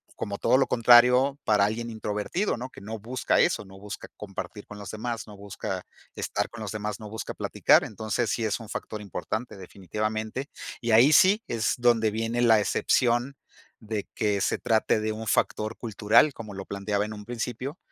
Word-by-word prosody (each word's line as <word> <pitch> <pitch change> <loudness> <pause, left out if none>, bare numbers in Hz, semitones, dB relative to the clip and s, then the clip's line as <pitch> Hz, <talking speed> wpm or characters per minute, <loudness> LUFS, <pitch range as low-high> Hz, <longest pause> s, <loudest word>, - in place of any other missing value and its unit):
como 100 0 -4
todo 130 - +3
lo 135 - +3
contrario 125 +4 +5
para 105 -2 +3
alguien 115 +3 -3
introvertido, 110 - -2
¿no?, 130 +2 -6
que - - -14
no 110 +2 -6
busca 120 +4 0
eso, 105 - +2
no 95 0 -13
busca 105 +1 -8
compartir 105 0 -7
con 105 - -10
los 100 -2 -8
demás, 115 +1 -4
no 105 - -11
busca 100 0 -5 0.3
estar - - -2
con - - -10
los - - -4
demás, 105 -1 -4
no 105 -1 -8
busca 110 +1 -5
platicar. - - +3
Entonces, 110 +2 -2
sí 115 - -1
es 110 - -1
un 115 - -10
factor 105 - -5
importante, 105 +3 -5
definitivamente. 110 - -4 0.3
Y 120 - -1
ahí 120 +7 +7
sí 200 +8 +6
es 115 -2 0
donde 120 -3 +3
viene 115 +2 -1
la 115 -3 +6
excepción 120 +5 +1 0.4
de 110 -2 -4
que 105 -2 +1
se - - +1
trate 110 -1 +2
de 110 0 -1
un 110 +1 -6
factor 110 +1 0
cultural, 115 +5 +3
como 110 -3 -8
lo 95 0 -7
planteaba 100 +1 -2
en 105 - -6
un 105 -1 -9
principio. 125 - -4
110 Hz, 190 wpm, -27 LUFS, 105-120 Hz, 0.4 s, ahí